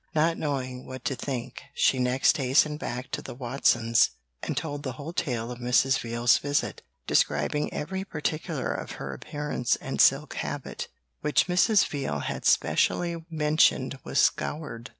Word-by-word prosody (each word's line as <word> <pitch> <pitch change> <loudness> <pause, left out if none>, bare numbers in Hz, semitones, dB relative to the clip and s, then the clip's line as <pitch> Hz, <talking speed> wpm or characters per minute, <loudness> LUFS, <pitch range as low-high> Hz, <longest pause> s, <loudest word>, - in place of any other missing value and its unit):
Not 165 +2 +3
knowing 130 -5 -3
what 130 -1 -8
to 135 - 0
think, 125 -1 -5
she 130 - +3
next 125 +6 +3
hastened 150 +3 +2
back 125 0 -5
to 140 +1 -2
the - - -8
Watsons, 120 -2 +2 0.3
and - - -3
told 145 -2 -3
the 130 -3 -4
whole 145 +6 -7
tale 120 -8 -2
of 120 - -7
Mrs. 125 +2 +3
Veal's 120 +1 +2
visit, 145 0 -1 0.2
describing 75 - +1
every 190 +5 -3
particular 155 -3 -3
of - - -5
her 70 -1 -6
appearance 145 - -2
and - - -2
silk - - +4
habit, - - -4 0.3
which 150 - +2
Mrs. 190 +4 +4
Veal 135 - -3
had - - -4
specially 170 -1 +2
mentioned 150 -4 +2
was - - -4
scoured. 140 -6 0
135 Hz, 150 wpm, -27 LUFS, 125-150 Hz, 0.3 s, silk